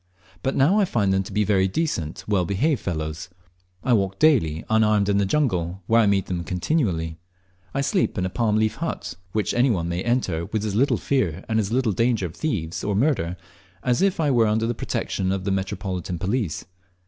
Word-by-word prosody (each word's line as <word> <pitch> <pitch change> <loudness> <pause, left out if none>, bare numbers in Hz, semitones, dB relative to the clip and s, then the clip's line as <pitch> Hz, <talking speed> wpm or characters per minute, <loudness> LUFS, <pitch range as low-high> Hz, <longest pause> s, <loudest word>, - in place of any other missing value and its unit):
But 135 - -1
now 165 +11 +4
I 205 - +4
find 100 - +1
them 95 - +2
to 95 - -8
be 105 +2 +1
very 95 -2 +2
decent, 95 - -2
well 100 -4 +2
behaved 115 - 0
fellows; 80 +1 -4 0.5
I 125 - +2
walk 100 -3 +1
daily 90 - +3
unarmed 105 -2 +3
in 100 0 +3
the 100 - +1
jungle, 95 - 0
where 115 +3 +4
I 105 - +3
meet 100 -1 +2
them 90 -2 -3
continually; 90 - -1 0.6
I 140 - +1
sleep 160 - 0
in 90 - 0
a - - -1
palm 110 -1 +1
leaf 110 0 +1
hut, - - -4 0.2
which 105 +1 0
any 125 +3 +3
one 85 -7 0
may 85 +1 -2
enter, 95 -8 0
with 110 0 -2
as 105 - -2
little 130 +7 +2
fear 95 - -1
and 110 0 +1
as 105 -1 -1
little 125 -2 +2
danger 115 0 +1
of 85 - -6
thieves 90 - -3
or 100 -1 0
murder 100 - +1 0.5
as 125 +3 +1
if 195 -2 +2
I 150 -3 +2
were 115 -3 +4
under 110 +1 +1
the 120 - 0
protection 95 -4 -2
of 95 -1 -2
the 100 - -1
Metropolitan 95 -2 -3
police. 95 -1 -2
100 Hz, 205 wpm, -24 LUFS, 90-120 Hz, 0.6 s, now